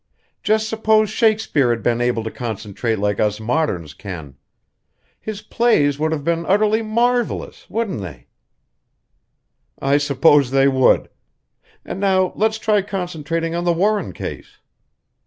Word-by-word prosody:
Just 215 +1 +1
suppose 220 -1 +2
Shakespeare 220 - +2
had 115 -2 -1
been 120 +1 +1
able 120 -2 0
to 110 - -5
concentrate 110 -1 -3
like 105 0 -1
us 105 -1 0
moderns 110 - -1
can! 80 -7 -8 0.8
His 215 -1 -7
plays 150 -13 +2
would 155 +1 0
have 155 -3 -2
been 170 +2 0
utterly 215 +3 +3
marvelous, 235 +2 -1
wouldn't 215 - -2
they?" 70 -10 -9 1.5
"I 140 +1 +2
suppose 145 -1 +3
they 135 +1 +3
would. 130 -1 +3 0.8
And - - -6
now 190 -2 +2
let's 220 +1 +1
try 215 -2 +2
concentrating 165 -4 -3
on 170 0 -2
the 175 -1 +2
Warren 205 +5 0
case." - - -8
160 Hz, 135 wpm, -20 LUFS, -, 1.5 s, utterly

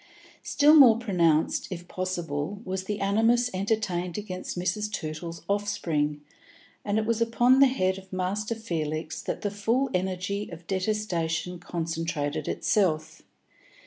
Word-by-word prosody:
Still 295 +1 +4
more 260 -8 +8
pronounced, 170 -9 +1
if 175 -2 -7
possible, 180 -1 -3
was 190 0 -3
the 210 +1 -3
animus 225 +5 +3
entertained 185 -3 -1
against 185 -3 -5
Mrs. 210 +4 -1
Tootle's 165 -1 -5
offspring, 165 -8 -1 0.6
and 205 +1 0
it 220 - +1
was 230 0 0
upon 240 +3 +4
the 275 - +8
head 190 -7 0
of 190 0 -17
Master 200 +4 -2
Felix 160 -6 -3
that - - -4
the 205 - -1
full 230 +6 0
energy 185 +2 -2
of 170 0 -10
detestation 180 -3 -1
concentrated 165 -4 -3
itself. 170 -7 0
185 Hz, 130 wpm, -27 LUFS, 170-215 Hz, 0.6 s, more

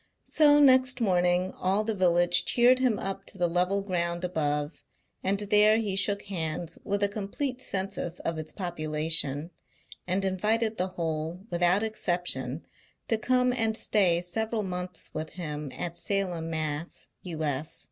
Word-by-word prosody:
So 295 -1 +5
next 260 -2 +5
morning 180 -3 +2
all 195 +3 +1
the 220 +1 -1
village 175 -2 +3
cheered 250 +1 +4
him 250 -5 +2
up 195 0 -3
to - - -8
the 175 -1 +2
level 180 +3 +1
ground 170 -2 -1
above, 150 -3 -2 0.4
and 195 +1 +1
there 210 +1 +5
he 210 -4 -1
shook 200 +1 +1
hands 165 -3 -3
with 200 0 -1
a - - +5
complete 225 +6 -4
Census 190 -5 -2
of 165 -1 -2
its 155 0 -5
population, 155 -3 -2 0.6
and 190 +2 0
invited 215 +4 +1
the 185 - 0
whole, 165 +1 -3
without 175 +4 +3
exception, 175 - -2 0.4
to 225 - +3
come 250 +1 +2
and 225 -3 0
stay 180 -5 +2
several 220 +5 -2
months 180 -2 -5
with 155 0 -5
him 150 -5 -5
at 170 -1 -4
Salem, 175 -3 -1
Mass., 155 0 -3 0.2
U.S. 155 -4 -3
180 Hz, 145 wpm, -28 LUFS, 165-210 Hz, 0.6 s, So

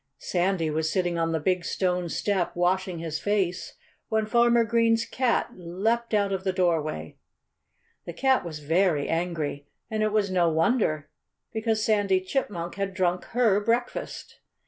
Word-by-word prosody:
Sandy 175 -3 0
was 155 +1 0
sitting 175 -3 0
on 165 0 0
the 160 - 0
big 180 +3 0
stone 180 -1 -1
step, 190 0 -1
washing 180 +1 0
his 160 -1 -4
face, 195 -4 -1 0.3
when 220 -1 +1
Farmer 235 +1 +4
Green's 230 0 +2
cat 255 -2 0
leaped 215 +7 -1
out 200 -1 +1
of 190 -1 -3
the 190 - +1
doorway. 160 - -1 0.9
The 170 - -5
cat 265 +7 +2
was 155 -3 -7
very 165 -2 +2
angry. 160 -4 -2 0.2
And 215 0 -1
it 215 0 +1
was 205 -2 +1
no 175 -2 +3
wonder, 160 - +1 0.4
because 220 -1 0
Sandy 205 -3 +2
Chipmunk 185 -4 -3
had 195 -1 -3
drunk 180 -2 0
her 225 -4 +2
breakfast. 235 +3 -2
185 Hz, 150 wpm, -26 LUFS, 170-215 Hz, 0.9 s, Farmer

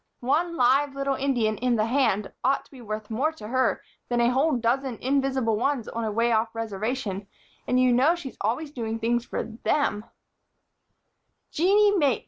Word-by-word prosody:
One 330 +7 0
live 275 +3 +3
little 275 0 0
Indian 245 -6 0
in 250 -1 +1
the 215 -1 +1
hand 230 -5 +1
ought 275 - +1
to - - -25
be 265 -3 -12
worth 215 -1 -6
more 270 +8 +1
to 215 -10 -10
her 260 +1 +1 0.3
than 240 -1 +1
a 235 +1 +3
whole 285 +5 +2
dozen 245 +1 -1
invisible 265 -4 +1
ones 255 0 -1
on 230 - -4
a 220 - -1
way 230 +3 +1
off 225 0 0
Reservation; 215 -2 -3 0.4
and 250 - +2
you 255 -1 +4
know 275 +8 +4
she's 285 -8 -8
always 250 +9 -1
doing 225 -5 -3
things 235 +1 0
for - - -3
them." 225 -1 -1 1.5
"Jeanie 405 +5 +4
Mapes!" 285 - +2
250 Hz, 175 wpm, -26 LUFS, 225-275 Hz, 1.5 s, you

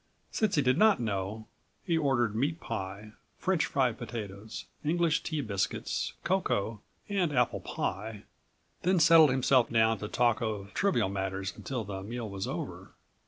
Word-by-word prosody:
Since 215 -3 +1
he 145 - +3
did 130 +4 +3
not 215 -1 +5
know, 105 -1 -3 0.4
he 170 - 0
ordered 125 -8 +1
meat 145 +8 0
pie, 105 -3 -5 0.3
French 185 -4 +1
fried 130 -4 +1
potatoes, 105 -2 -6 0.2
English 165 +1 +2
tea 155 -2 -2
biscuits, 100 -6 -2
cocoa 115 - 0 0.3
and 190 -6 +1
apple 125 -4 +1
pie, 105 +1 -4 0.6
then 185 0 +3
settled 160 -1 +8
himself 130 -1 +3
down 110 -2 +3
to 105 - -4
talk 120 +2 +2
of 105 -3 -3
trivial 120 - +2
matters 95 0 -3
until 125 -4 -4
the 95 -1 -6
meal 115 +3 -5
was 100 -2 -4
over. - - -6
120 Hz, 150 wpm, -30 LUFS, 105-155 Hz, 0.6 s, settled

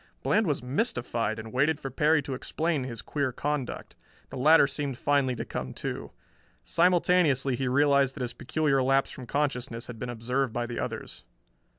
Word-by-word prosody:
Bland 215 -1 +2
was 145 -5 -1
mystified 125 - -1
and 110 +1 -8
waited 145 +4 +2
for 135 - -6
Perry 155 0 +3
to 135 - -4
explain 155 +2 -2
his 120 -3 -5
queer 140 -3 -1
conduct. 145 0 -3 0.4
The - - -7
latter 155 +4 +6
seemed 140 -1 -3
finally 140 -3 +1
to - - -4
come 65 0 -5
to. - - -5 0.5
Simultaneously 170 -6 +3
he 130 +2 -2
realized 140 0 +3
that 145 - -6
his 125 -1 -3
peculiar 135 +1 0
lapse 135 +1 +2
from 130 -2 -9
consciousness 125 -5 -2
had 120 -2 -9
been 125 - -4
observed 125 +2 -1
by 120 - -1
the 120 0 -5
others. - - -5
135 Hz, 175 wpm, -28 LUFS, 125-150 Hz, 0.5 s, latter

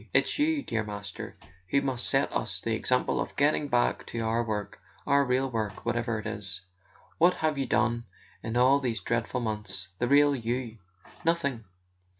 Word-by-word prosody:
It's - - +3
you, 300 -1 +2
dear 115 -1 -1
Master, 100 -2 -6 0.3
who 140 - +4
must 130 -3 -1
set - - +2
us - - -1
the - - -1
example - - +1
of - - -5
getting 145 0 +2
back 120 -2 +2
to 115 - -4
our 115 +1 +1
work, 105 -3 -4 0.2
our 140 0 +4
real 130 0 +1
work, 110 -3 -3
whatever 120 -1 0
it 110 - -6
is. 100 -4 -3 0.6
What 175 +2 +5
have 155 -1 0
you 135 -2 -1
done 120 0 +1 0.4
in 115 +1 -3
all 130 +3 +5
these 120 -6 -1
dreadful 115 +5 -1
months—the 105 -2 -3
real 145 +1 +5
You? 120 -1 -3 0.4
Nothing! 140 -9 0
120 Hz, 165 wpm, -28 LUFS, 110-140 Hz, 0.6 s, What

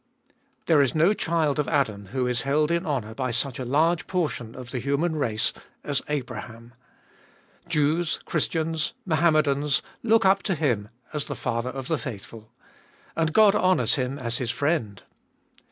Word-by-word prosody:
THERE 160 -4 +5
is 135 -1 +1
no 165 +6 +4
child 160 -6 0
of 150 - 0
Adam 110 -10 0
who 125 +4 -1
is 125 -1 0
held 150 +3 +1
in 170 +1 0
honour 120 -7 -2
by 130 +2 -2
such 125 +2 -1
a 130 - -3
large 160 +6 +2
portion 150 -11 -2
of 125 -1 -9
the 130 - -2
human 140 +6 0
race 115 -8 0 0.3
as 145 -2 -1
Abraham. 120 -4 -5 0.9
Jews, 160 0 +1
Christians, 160 0 -1
Mohammedans, 155 -4 +2 0.2
look 225 -2 +3
up 195 +1 +4
to 190 - -1
him 120 -10 0 0.2
as 150 -2 -1
the - - -5
father 115 +2 -2
of 135 -1 -6
the 160 - 0
faithful. 110 -2 -8 0.6
And 160 -1 +1
God 210 +2 +6
honours 185 -2 +3
him 130 0 -1
as 120 -2 -2
His 125 -3 -2
friend 115 - -1
145 Hz, 160 wpm, -25 LUFS, 125-160 Hz, 0.9 s, God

